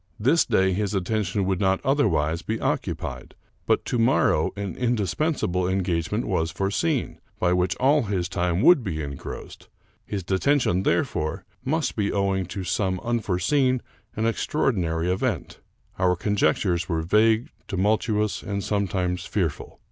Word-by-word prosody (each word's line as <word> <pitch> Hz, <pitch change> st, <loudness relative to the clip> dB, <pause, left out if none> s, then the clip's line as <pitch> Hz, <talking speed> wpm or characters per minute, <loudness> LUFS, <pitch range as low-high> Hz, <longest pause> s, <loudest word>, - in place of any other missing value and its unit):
This 135 Hz, +10 st, +3 dB
day 95 Hz, 0 st, +3 dB
his 100 Hz, +1 st, -1 dB
attention 100 Hz, 0 st, 0 dB
would 95 Hz, -1 st, 0 dB
not 95 Hz, -1 st, +2 dB
otherwise 85 Hz, -, +2 dB
be 110 Hz, +4 st, -3 dB
occupied; -, -, -3 dB, 0.3 s
but -, -, +2 dB
to 120 Hz, -, -1 dB
morrow 120 Hz, +4 st, +3 dB
an 100 Hz, -3 st, -4 dB
indispensable 115 Hz, -, 0 dB
en 95 Hz, 0 st, 0 dB
gagement 85 Hz, -3 st, -1 dB
was 80 Hz, 0 st, 0 dB
foreseen, 100 Hz, -, -1 dB, 0.2 s
by 90 Hz, 0 st, +2 dB
which 90 Hz, -1 st, +1 dB
all 140 Hz, -, +3 dB
his 95 Hz, -4 st, -1 dB
time 90 Hz, +1 st, 0 dB
would 160 Hz, -5 st, +6 dB
be 80 Hz, -7 st, -3 dB
engrossed; 70 Hz, -1 st, -8 dB, 0.3 s
his 100 Hz, -2 st, -4 dB
detention, 95 Hz, +1 st, +2 dB
therefore, 75 Hz, -4 st, -1 dB, 0.2 s
must 155 Hz, +4 st, -1 dB
be 100 Hz, -2 st, 0 dB
owing 95 Hz, -2 st, 0 dB
to 95 Hz, +1 st, -5 dB
some 95 Hz, 0 st, -1 dB
unforeseen 120 Hz, -, +1 dB, 0.4 s
and 110 Hz, -, -1 dB
extraordinary 90 Hz, -, 0 dB
event. 95 Hz, -, -2 dB, 0.4 s
Our 90 Hz, -1 st, +3 dB
conjectures 90 Hz, -1 st, +1 dB
were 80 Hz, -2 st, 0 dB
vague, 110 Hz, +6 st, +3 dB, 0.2 s
tumultuous, 105 Hz, +2 st, 0 dB
and 100 Hz, -1 st, -3 dB
sometimes 90 Hz, -3 st, -1 dB
fearful. -, -, -2 dB
95 Hz, 140 wpm, -25 LUFS, 90-115 Hz, 0.4 s, would